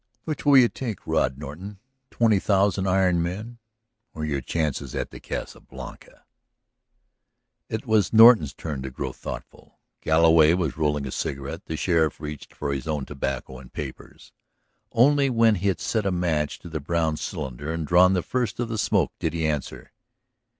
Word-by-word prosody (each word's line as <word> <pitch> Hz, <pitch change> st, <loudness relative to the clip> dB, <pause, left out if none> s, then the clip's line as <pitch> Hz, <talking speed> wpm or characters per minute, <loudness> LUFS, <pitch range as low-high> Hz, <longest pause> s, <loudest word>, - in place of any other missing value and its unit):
Which 155 Hz, -2 st, -5 dB
will 140 Hz, -1 st, +7 dB
you 125 Hz, -2 st, +7 dB
take, 115 Hz, -5 st, -6 dB
Rod 65 Hz, +1 st, 0 dB
Norton? 80 Hz, +8 st, -8 dB, 0.3 s
Twenty 110 Hz, -4 st, +2 dB
thousand 100 Hz, -1 st, +1 dB
iron 90 Hz, -2 st, +3 dB
men 105 Hz, +8 st, -5 dB, 0.6 s
or 75 Hz, -1 st, -3 dB
your 70 Hz, -3 st, -2 dB
chances 75 Hz, +1 st, -2 dB
at -, -, -3 dB
the -, -, -10 dB
Casa -, -, -6 dB
Blanca?" -, -, -12 dB, 1.4 s
It 110 Hz, -, -4 dB
was 110 Hz, -3 st, +2 dB
Norton's 110 Hz, -, +7 dB
turn 75 Hz, -5 st, -5 dB
to 65 Hz, -, -5 dB
grow 65 Hz, 0 st, -5 dB
thoughtful. -, -, -9 dB, 0.2 s
Galloway 80 Hz, 0 st, +5 dB
was 85 Hz, -7 st, -1 dB
rolling 75 Hz, -2 st, 0 dB
a 65 Hz, -, -5 dB
cigarette. 70 Hz, 0 st, -4 dB
The 80 Hz, -, -4 dB
sheriff 80 Hz, -4 st, +1 dB
reached 75 Hz, -2 st, -7 dB
for 70 Hz, -1 st, -3 dB
his 70 Hz, 0 st, -5 dB
own 75 Hz, -4 st, -2 dB
tobacco 65 Hz, -2 st, -4 dB
and 65 Hz, -1 st, -14 dB
papers. -, -, -9 dB, 0.6 s
Only 140 Hz, +3 st, +4 dB
when 115 Hz, -2 st, +4 dB
he 100 Hz, 0 st, -1 dB
had 95 Hz, -5 st, 0 dB
set 105 Hz, +7 st, -1 dB
a -, -, +1 dB
match 80 Hz, -4 st, -1 dB
to 85 Hz, -, -10 dB
the 80 Hz, -1 st, -4 dB
brown 80 Hz, +1 st, 0 dB
cylinder 70 Hz, 0 st, -5 dB
and 80 Hz, -1 st, -3 dB
drawn 90 Hz, +4 st, +5 dB
the 90 Hz, -3 st, 0 dB
first 125 Hz, -5 st, -2 dB
of 120 Hz, -1 st, -2 dB
the 110 Hz, -2 st, -3 dB
smoke -, -, +1 dB
did 80 Hz, -, -1 dB
he 80 Hz, -1 st, -1 dB
answer. 75 Hz, -3 st, -3 dB
85 Hz, 170 wpm, -25 LUFS, 75-105 Hz, 1.4 s, will